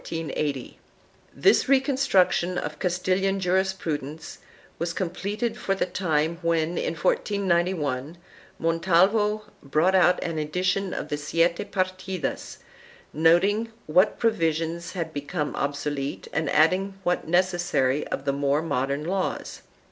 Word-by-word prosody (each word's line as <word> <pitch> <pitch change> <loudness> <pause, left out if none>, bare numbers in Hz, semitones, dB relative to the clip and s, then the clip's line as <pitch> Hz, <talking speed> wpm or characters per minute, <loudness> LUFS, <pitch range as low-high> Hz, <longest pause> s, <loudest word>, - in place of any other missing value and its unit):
2 165 -1 -4 1.0
This 395 - +3
reconstruc 265 -7 +3
tion 180 +1 -1
of 150 -2 -4
Castilian 185 +2 0
jurisprudence 175 -5 -2 0.4
was 170 0 -2
completed 200 +6 -2
for 195 - -1
the - - 0
time 165 -3 -1
when, 165 -2 +1
in 165 - -2
1491, 170 -5 0 0.4
Montalvo 190 +6 +2 0.2
brought 155 +7 +2
out 180 -1 +5
an 165 -2 -3
edition 185 +5 -1
of - - -4
the 145 - -1
Siete 165 +3 +1
Partidas, 185 -3 -3 0.6
noting 195 +8 +3
what 185 +7 +3
provisions 165 -5 0
had 165 -4 -4
become 145 +1 -3
obsolete 145 0 -3
and 150 -1 0
adding 185 +6 +3
what 180 -1 0
was - - -10
necessary 175 -7 +1
of 135 - -4
the 140 - +1
more 140 +2 +1
modern 140 -1 -1
laws. 185 +3 -3
170 Hz, 120 wpm, -25 LUFS, 155-190 Hz, 1.0 s, out